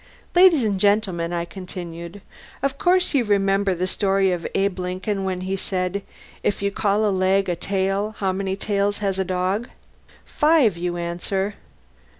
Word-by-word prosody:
"Ladies 350 -6 +6
and 205 -3 0
Gentlemen," 195 -5 +1
I 170 -1 -1
continued, 175 0 -8 0.4
"of 275 0 -1
course 360 -1 +3
you 270 -4 +3
remember 195 -2 +2
the 180 +2 -1
story 195 0 +1
of 175 -2 -2
Abe 195 -1 0
Lincoln 185 +2 -2
when 185 -1 -2
he 190 +1 -2
said, 185 0 -2 0.4
'if 200 - -1
you 200 - +1
call 205 +1 +1
a 210 - +2
leg 190 +1 +2
a 175 - 0
tail, 195 +3 -1
how 195 -2 0
many 190 0 -2
tails 205 0 0
has 195 -2 -1
a - - +2
dog?' 185 +5 -1 0.6
'Five,' 295 - +3
you 175 0 -3
answer. 175 +4 -2
195 Hz, 160 wpm, -23 LUFS, 185-205 Hz, 0.6 s, Ladies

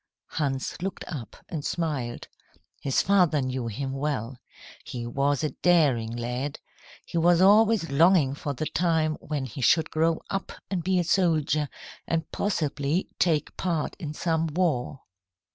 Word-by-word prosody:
Hans 140 +1 -2
looked 190 0 -4
up 130 -9 -6
and 155 -4 -5
smiled. 140 -9 -3 0.5
His 135 -2 +1
father 180 -6 +4
knew 130 -2 -2
him 135 +5 -3
well. 135 -3 -3 0.4
He 120 -2 -6
was 140 +4 0
a 155 - 0
daring 145 -11 +3
lad. 125 +5 -3 0.5
He 170 - -2
was 170 +1 +4
always 205 -3 +5
longing 160 -2 +4
for 145 0 -4
the 155 - -3
time 160 -1 +1
when 150 -3 -3
he 130 +2 -7
should 160 +6 +3
grow 160 +1 +2
up 195 0 -3 0.2
and 180 -4 -1
be 185 +1 +1
a 175 - +3
soldier, 155 -5 +2 0.4
and 165 -1 -1
possibly 155 -3 -1
take 155 -4 +1
part 170 -5 -1
in 155 -4 -5
some 165 -1 0
war. 150 -6 -1
155 Hz, 145 wpm, -26 LUFS, 135-170 Hz, 0.5 s, always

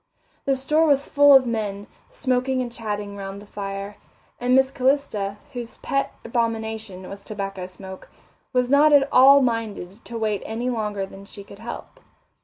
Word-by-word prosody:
The 275 - +2
store 300 +5 +2
was 280 -1 +2
full 285 0 +6
of 265 -1 +6
men, 210 -4 -3 0.2
smoking 255 0 0
and 245 -2 -3
chatting 210 -3 -4
around 195 0 -6
the 205 - -11
fire, 200 0 -6 0.4
and 250 +1 +2
Miss 265 0 +4
Calista, 255 -7 0 0.2
whose 240 -2 -7
pet 275 0 -1
abomination 220 -4 -3
was 200 - -9
tobacco 195 -3 -5
smoke, 190 0 -11 0.4
was 250 -1 +2
not 290 +3 +5
at 280 -1 +6
all 275 +2 +8
minded 225 -4 -3
to 235 - -6
wait 215 -2 -1
any 235 +3 -3
longer 210 -4 -2
than 195 +1 -12
she 200 0 -11
could 200 0 -14
help. 235 +1 -8
225 Hz, 165 wpm, -23 LUFS, 200-255 Hz, 0.4 s, all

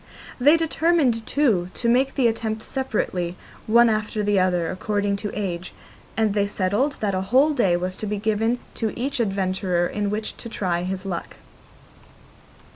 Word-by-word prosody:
They 290 +6 +6
determined, 315 -8 +1
too, 215 -12 +2
to 235 - -1
make 260 +3 +2
the 265 - +2
attempt 220 -1 0
separately, 190 -9 -2 0.3
one 235 +2 +6
after 215 -1 -1
the 205 -1 +2
other, 180 -2 +1
according 205 +1 -1
to 205 +1 -4
age, 185 -2 -4 0.4
and 220 -2 +2
they 200 -1 +1
settled 205 +9 0
that 205 -2 0
a 185 - 0
whole 260 +10 +3
day 195 -11 +2
was 185 +1 -3
to 215 - -4
be 210 0 -2
given 220 +3 +1 0.2
to 220 -2 -3
each 275 +2 -2
adventurer 190 -4 0
in 205 +3 -2
which 215 +1 -3
to 230 - -7
try 180 -5 -1
his 185 +1 -4
luck. 180 -3 -5
210 Hz, 165 wpm, -23 LUFS, 185-235 Hz, 0.4 s, They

